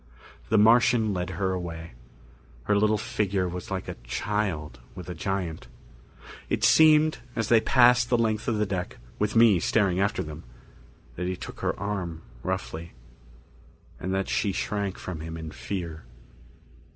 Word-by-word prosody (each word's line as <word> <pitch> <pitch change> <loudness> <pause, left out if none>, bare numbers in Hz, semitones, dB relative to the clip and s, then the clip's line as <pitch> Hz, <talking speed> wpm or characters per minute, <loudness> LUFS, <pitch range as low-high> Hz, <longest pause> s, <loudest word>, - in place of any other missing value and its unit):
The 110 - +3
Martian 115 0 +5
led 90 -1 -2
her 95 0 0
away. 85 -2 -5 0.7
Her 100 - +1
little 105 +1 +3
figure 100 -6 -1
was 90 0 -6
like 95 -1 -4
a - - -4
child 80 - -2 0.2
with 90 -1 -8
a - - -3
giant. 85 -1 -3 0.8
It - - -1
seemed, 155 -1 +6 0.2
as 115 -2 -1
they 115 -2 +6
passed 125 0 +5
the 120 - +3
length 110 -2 0
of 115 - +1
the 105 - +1
deck, 95 -3 -4 0.2
with 105 +1 0
me 115 -5 +6
staring 95 0 +2
after 100 -1 +1
them, 75 -1 -8 0.7
that 90 +1 -2
he 90 - -1
took - - -9
her - - -2
arm 90 -6 -4 0.2
roughly. 80 +6 -4 1.1
And 95 - -3
that 95 0 -1
she 100 - 0
shrank 100 0 -2
from 90 -4 -6
him 80 +1 -6
in 80 -1 -7
fear. 85 -5 -5
95 Hz, 155 wpm, -26 LUFS, 85-110 Hz, 1.1 s, seemed